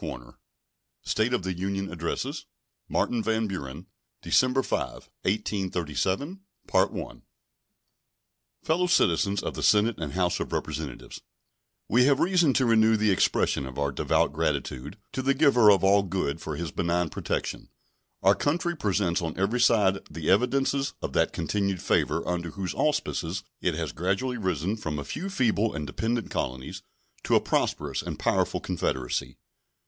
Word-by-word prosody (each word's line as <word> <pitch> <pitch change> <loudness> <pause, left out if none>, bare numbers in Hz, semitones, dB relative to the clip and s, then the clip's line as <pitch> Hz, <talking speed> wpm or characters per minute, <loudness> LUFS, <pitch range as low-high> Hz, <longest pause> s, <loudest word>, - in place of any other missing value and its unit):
State 110 +3 +1
of 125 - 0
the 95 0 -2
Union 95 +2 -3
Address 85 -1 -3 0.4
Martin 120 -2 0
van 110 0 0
Buren 85 -5 -6 0.4
December 130 +1 +3
5, - - -4
1837 95 - -1 2.2
Fellow 175 +3 +1
Citizens 100 - +2
of - - -3
the - - -5
Senate 105 0 +3
and 75 -4 -4
House 90 -1 +1
of - - -4
Representatives: 75 -4 -5 0.7
We 125 +4 +4
have 140 0 +4
reason 175 -5 +4
to 130 - +3
renew 110 -1 +4
the 105 -1 +2
expression 70 -6 +1
of 65 - -9
our 70 -1 0
devout - - +1
gratitude 70 +10 -2
to 130 - -2
the 135 +1 +2
Giver 130 -7 +6
of 95 -2 +3
All 100 +1 +5
Good 90 -5 -2
for 75 - -4
His 85 0 -4
benign 85 -1 0
protection. - - -3 0.5
Our 95 - +6
country 165 - 0
presents 100 - 0
on 80 -2 -4
every 100 +6 +1
side 105 -5 +4
the 80 0 -1
evidences 135 +6 +1
of - - -3
that - - +2
continued 100 +3 -1
favor - - 0
under 85 -1 -2
whose 95 +3 -4
auspices 105 - -1 0.2
it, 90 -3 0
has 80 -3 -3
gradually 100 - -1
risen 95 +1 -1
from 80 -7 -4
a 75 - -3
few 185 - -5
feeble 115 - +1
and 75 - -3
dependent 115 +10 -2
colonies 65 +1 -4 0.4
to - - +3
a - - +7
prosperous - - -1
and - - -5
powerful - - +1
confederacy. 65 0 -2
100 Hz, 145 wpm, -27 LUFS, 85-120 Hz, 2.2 s, a